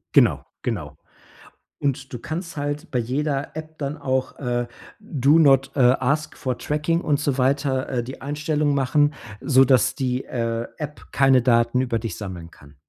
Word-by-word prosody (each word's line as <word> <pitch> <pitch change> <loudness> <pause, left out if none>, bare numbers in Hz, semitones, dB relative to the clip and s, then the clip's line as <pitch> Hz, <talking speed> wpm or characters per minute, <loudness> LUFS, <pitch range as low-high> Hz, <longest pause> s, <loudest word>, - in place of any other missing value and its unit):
Genau. - - +4 0.2
Genau. - - -4 0.8
Und 135 -1 -2
du 120 - -4
kannst 170 +4 -5
halt 145 +3 -3
bei 125 - +1
jeder 140 +4 -2
App 155 0 -8
dann 145 +1 -4
auch, 130 -2 -2
äh, 120 -2 -2 0.3
Do 150 - +3
not, 135 -3 +5
äh, - - -2
ask 130 +4 +2
for 130 -2 -3
Tracking 150 +3 0
und 145 -5 +1
so 140 -2 0
weiter, 135 0 +1
äh, 125 -3 -1
die 130 +3 -8
Einstellung 150 +1 -1
machen, 145 +2 +2 0.3
sodass 130 -1 +4
die, 130 -1 -2
äh, 115 -1 -2
App 150 -1 -7
keine 135 -2 +5
Daten 120 0 +3
über 125 -3 0
dich 110 -6 -5
sammeln 90 -5 -7
kann. 70 +1 -18
135 Hz, 165 wpm, -23 LUFS, 125-150 Hz, 0.8 s, not